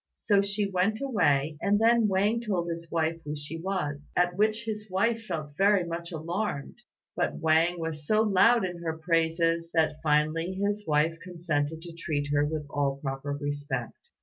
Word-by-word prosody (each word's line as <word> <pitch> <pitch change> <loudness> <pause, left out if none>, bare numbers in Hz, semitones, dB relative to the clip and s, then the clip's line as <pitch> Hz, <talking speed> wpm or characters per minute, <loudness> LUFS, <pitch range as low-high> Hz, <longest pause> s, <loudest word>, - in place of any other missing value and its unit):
So 200 -2 +2
she 200 +1 0
went 195 +3 0
away, 155 - +1
and 205 +1 +2
then 230 0 +4
Wang 205 +4 +1
told 190 -7 -1
his 170 0 -6
wife 165 0 -1
who 150 0 -4
she 150 +3 -6
was, 150 -6 -3
at 175 0 +2
which 215 +3 +1
his 215 -1 -5
wife 225 +4 0
felt 155 -4 -5
very 200 +1 +4
much 170 0 -5
alarmed; 170 +1 -3 0.4
but - - 0
Wang 165 +2 +2
was 155 -2 -5
so 215 0 +4
loud 220 +2 +4
in 175 -1 -5
her 160 -1 -3
praises, 165 0 +1
that 155 -1 +1
finally 155 +3 +1
his 205 +2 -2
wife 155 +2 +2
consented 160 -3 -2
to 170 -1 -9
treat 150 -3 -3
her 145 0 +3
with 150 0 -2
all 140 -1 0
proper 135 +1 -4
respect. 145 -4 -4
170 Hz, 175 wpm, -28 LUFS, 150-200 Hz, 0.4 s, then